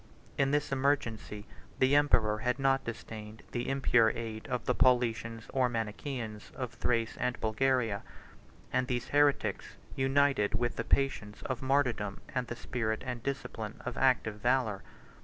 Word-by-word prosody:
In 135 Hz, -1 st, +2 dB
this 145 Hz, +1 st, 0 dB
emergency, 130 Hz, -6 st, 0 dB, 0.3 s
the 130 Hz, +2 st, +4 dB
emperor 110 Hz, -7 st, +3 dB
had 125 Hz, +1 st, 0 dB
not 135 Hz, 0 st, +2 dB
disdained 110 Hz, -1 st, -7 dB
the 120 Hz, +1 st, -2 dB
impure 125 Hz, -4 st, +4 dB
aid 110 Hz, 0 st, -5 dB
of 125 Hz, -3 st, -2 dB
the 125 Hz, -, +2 dB
Paulicians 115 Hz, -3 st, +2 dB
or 130 Hz, -2 st, +3 dB
Manichaeans 115 Hz, -1 st, -4 dB
of 125 Hz, -2 st, -4 dB
Thrace 115 Hz, -2 st, 0 dB
and 125 Hz, 0 st, -1 dB
Bulgaria; 115 Hz, -2 st, +1 dB, 0.7 s
and 130 Hz, 0 st, +1 dB
these 125 Hz, -2 st, -2 dB
heretics 145 Hz, -1 st, +2 dB, 0.2 s
united 135 Hz, -5 st, +2 dB
with 120 Hz, -1 st, 0 dB
the 115 Hz, -, -1 dB
patience 110 Hz, -6 st, 0 dB
of 130 Hz, -3 st, -3 dB
martyrdom 130 Hz, -7 st, +1 dB, 0.3 s
the 120 Hz, -, -4 dB
spirit 110 Hz, -3 st, -2 dB
and 125 Hz, -2 st, -4 dB
discipline 115 Hz, -5 st, -4 dB
of 125 Hz, -, -3 dB
active 120 Hz, -5 st, +2 dB
valor. 120 Hz, -4 st, +1 dB
120 Hz, 140 wpm, -31 LUFS, 110-135 Hz, 0.7 s, the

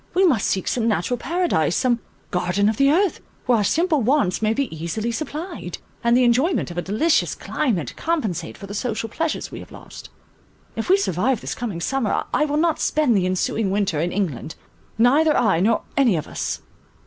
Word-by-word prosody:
We 380 Hz, +1 st, +5 dB
must 260 Hz, -, +2 dB
seek 190 Hz, -, -1 dB
some 235 Hz, -2 st, 0 dB
natural 225 Hz, +3 st, 0 dB
Paradise, 330 Hz, -, 0 dB
some 245 Hz, -2 st, +2 dB, 0.3 s
garden 180 Hz, +3 st, +1 dB
of 215 Hz, 0 st, +1 dB
the 275 Hz, 0 st, +4 dB
earth, 360 Hz, +3 st, +2 dB, 0.3 s
where 245 Hz, -3 st, +3 dB
our -, -, +1 dB
simple 320 Hz, -, +2 dB
wants 245 Hz, -6 st, +1 dB
may 215 Hz, 0 st, +2 dB
be 255 Hz, -6 st, -2 dB
easily 170 Hz, +9 st, -3 dB
supplied, 310 Hz, +7 st, -5 dB, 0.3 s
and 235 Hz, +1 st, +4 dB
the 255 Hz, -, +4 dB
enjoyment 250 Hz, -, +2 dB
of 175 Hz, -, -9 dB
a -, -, 0 dB
delicious 220 Hz, -, +1 dB
climate 205 Hz, -, -2 dB
compensate 215 Hz, -, -2 dB
for -, -, -9 dB
the 200 Hz, -, -8 dB
social 225 Hz, +1 st, -3 dB
pleasures 320 Hz, +6 st, -3 dB
we -, -, -7 dB
have -, -, -12 dB
lost. -, -, -11 dB, 0.7 s
If 225 Hz, -, -4 dB
we 380 Hz, -, +6 dB
survive 245 Hz, -, 0 dB
this -, -, -4 dB
coming 210 Hz, -8 st, -4 dB
summer, 265 Hz, +3 st, 0 dB
I 300 Hz, -, +3 dB
will 295 Hz, 0 st, -1 dB
not 325 Hz, 0 st, +1 dB
spend 300 Hz, -7 st, +2 dB
the 185 Hz, -2 st, +2 dB
ensuing 190 Hz, +3 st, 0 dB
winter 195 Hz, -6 st, 0 dB
in 170 Hz, +3 st, 0 dB
England; 160 Hz, -, -3 dB, 0.4 s
neither 290 Hz, +7 st, +4 dB
I 195 Hz, -8 st, +3 dB
nor 220 Hz, +5 st, +2 dB
any 250 Hz, -8 st, +4 dB
of 155 Hz, -, -3 dB
us." -, -, -4 dB
230 Hz, 195 wpm, -22 LUFS, 190-295 Hz, 0.7 s, we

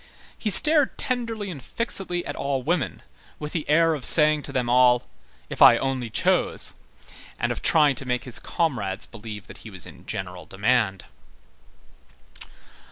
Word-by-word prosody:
He 215 Hz, -, -2 dB
stared 300 Hz, -, +5 dB
tenderly 230 Hz, -5 st, -4 dB
and 145 Hz, -6 st, -9 dB
fixedly 180 Hz, -, -2 dB
at -, -, -5 dB
all 135 Hz, -2 st, -2 dB
women, 160 Hz, -3 st, -2 dB, 0.3 s
with 150 Hz, 0 st, -6 dB
the 160 Hz, -5 st, -4 dB
air 165 Hz, +2 st, +4 dB
of 145 Hz, -4 st, -5 dB
saying 155 Hz, +1 st, +5 dB
to 140 Hz, -, -7 dB
them 130 Hz, -3 st, -1 dB
all: 125 Hz, 0 st, +3 dB, 0.4 s
"If -, -, -8 dB
I -, -, +8 dB
only 130 Hz, -3 st, -3 dB
chose!" -, -, 0 dB, 0.6 s
and -, -, -1 dB
of -, -, -4 dB
trying 150 Hz, -3 st, +4 dB
to 135 Hz, -, -3 dB
make 125 Hz, 0 st, -1 dB
his 125 Hz, -, -7 dB
comrades 115 Hz, -, -2 dB
believe 105 Hz, -3 st, -10 dB
that -, -, -13 dB
he 110 Hz, -, -11 dB
was 95 Hz, -5 st, -4 dB
in -, -, -14 dB
general 90 Hz, -3 st, -6 dB
demand. 100 Hz, +1 st, 0 dB
135 Hz, 160 wpm, -24 LUFS, 115-165 Hz, 0.6 s, I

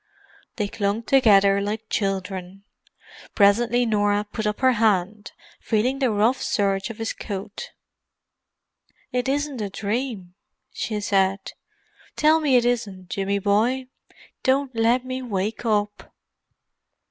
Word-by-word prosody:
They 210 Hz, -3 st, -1 dB
clung 205 Hz, +2 st, -2 dB
together 200 Hz, -7 st, +4 dB
like 215 Hz, +2 st, -4 dB
children. 195 Hz, -2 st, -3 dB, 0.7 s
Presently 235 Hz, +4 st, +3 dB
Norah 205 Hz, -2 st, +1 dB
put 215 Hz, -1 st, -2 dB
up 210 Hz, +3 st, -3 dB
her 260 Hz, -1 st, +5 dB
hand, 210 Hz, -1 st, 0 dB, 0.3 s
feeling 245 Hz, +5 st, 0 dB
the 260 Hz, -3 st, +2 dB
rough 220 Hz, +4 st, +1 dB
serge 195 Hz, -1 st, 0 dB
of 230 Hz, -, -8 dB
his 225 Hz, -1 st, -3 dB
coat. 200 Hz, 0 st, -7 dB, 1.4 s
"It 250 Hz, +1 st, -1 dB
isn't 285 Hz, -3 st, -2 dB
a 205 Hz, -, -3 dB
dream," 205 Hz, -2 st, -4 dB, 0.4 s
she 215 Hz, -2 st, -3 dB
said. 195 Hz, -1 st, 0 dB, 0.6 s
"Tell 310 Hz, +1 st, +4 dB
me 290 Hz, -4 st, +2 dB
it 240 Hz, -1 st, +4 dB
isn't, 200 Hz, -7 st, -2 dB
Jimmy 200 Hz, 0 st, -1 dB
boy. 230 Hz, +6 st, +1 dB, 0.5 s
Don't 265 Hz, -1 st, +1 dB
let 235 Hz, +3 st, +2 dB
me 255 Hz, 0 st, -4 dB
wake 215 Hz, -1 st, -3 dB
up." 205 Hz, -1 st, -1 dB
215 Hz, 125 wpm, -23 LUFS, 200-245 Hz, 1.4 s, her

